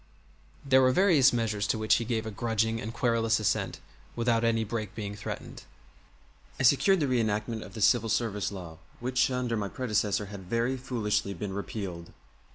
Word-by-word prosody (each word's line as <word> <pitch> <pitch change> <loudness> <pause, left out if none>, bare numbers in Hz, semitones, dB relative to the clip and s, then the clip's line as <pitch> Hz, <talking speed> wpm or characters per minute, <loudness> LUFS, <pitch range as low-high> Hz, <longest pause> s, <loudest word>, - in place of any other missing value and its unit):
There 130 -1 +5
were 130 0 +5
various 155 -5 +5
measures 110 -3 -1
to - - 0
which 110 0 +3
he 115 - -3
gave 115 -2 -1
a 110 - -4
grudging 115 +1 -1
and 110 - -5
querulous 115 -1 +1
assent 105 - -1 0.4
without 115 -1 +1
any 115 -1 +2
break 110 -1 -4
being 105 -2 -4
threatened. 105 - -7 1.0
I - - 0
secured 160 +9 +5
the 150 - +1
reenactment 110 -2 0
of 95 0 -11
the 110 - -5
Civil 115 +2 +4
Service 105 -3 -1
Law, 85 -5 -8 0.2
which 125 +1 +1
under 125 -2 -1
my 100 -2 -2
predecessor 105 -4 0
had 95 -3 -9
very 115 +3 +1
foolishly 105 -6 -2
been 95 +2 -5
repealed. 95 -5 -6
115 Hz, 170 wpm, -28 LUFS, 105-120 Hz, 1.0 s, There